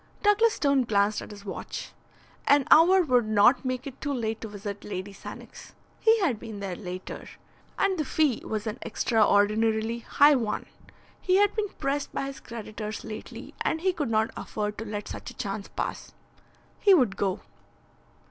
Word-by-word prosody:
Douglas 435 +2 +4
Stone 280 -3 +2
glanced 205 -1 +2
at - - -9
his 205 -1 -11
watch. 195 - -6 0.6
An 285 -1 +5
hour 365 +4 +7
would 250 -7 +2
not 215 +5 +5
make 255 0 -3
it 270 -2 -9
too 290 - -2
late 225 -3 -2
to 225 - -5
visit 205 -1 -7
Lady 200 0 -5
Sannox. - - -11 0.3
He 450 0 +4
had 270 - +1
been 220 -2 -8
there 195 -2 -4
later. 180 -1 -7 0.5
And 385 -3 +1
the - - +2
fee 295 -3 +1
was 215 0 -3
an 220 +2 -4
extraordinarily 220 +1 +2
high 290 +5 +5
one. 225 -6 -1 0.6
He 370 - +2
had 410 +1 +4
been 425 -2 -1
pressed 275 +1 -2
by - - -2
his 275 0 -7
creditors 215 -2 -7
lately, 215 -1 -8
and 320 - 0
he 375 +1 +2
could 295 -8 -2
not 220 0 +1
afford 210 -1 -4
to 225 - -5
let 210 -1 -5
such - - -7
a - - -12
chance - - -4
pass. - - -5 0.7
He 400 -2 +6
would 245 - +2
go. 195 -1 -1
230 Hz, 175 wpm, -27 LUFS, 210-290 Hz, 0.7 s, hour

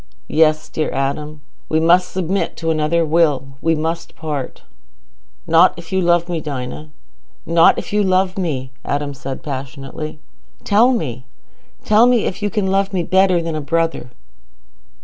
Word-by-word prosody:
"Yes, 155 0 +3
dear 155 - -2
Adam, 145 +3 -3 0.3
we 160 - +2
must 175 +3 +3
submit 190 +1 -2
to 165 -1 -1
another 160 +2 +1
Will. 150 -4 +1
We 165 0 +2
must 165 +2 -4
part." 150 -5 -5 0.8
"Not 165 +3 +5
if 170 -1 -11
you 190 0 +1
love 175 -1 +2
me, 170 -3 -3
Dinah—not 150 +4 -1
if - - -5
you 210 - +3
love 185 0 +1
me," 140 -9 -3
Adam 145 0 -2
said 135 0 -7
passionately. 140 +2 -6 0.5
"Tell 220 +5 +4
me—tell 210 - -1
me 245 -3 +3
if 190 - -3
you 205 - 0
can 210 -2 -1
love 195 +1 0
me 180 -2 0
better 185 -1 +3
than 165 -1 -3
a 155 - -3
brother?" 165 -2 -1
165 Hz, 150 wpm, -19 LUFS, 150-185 Hz, 0.8 s, Not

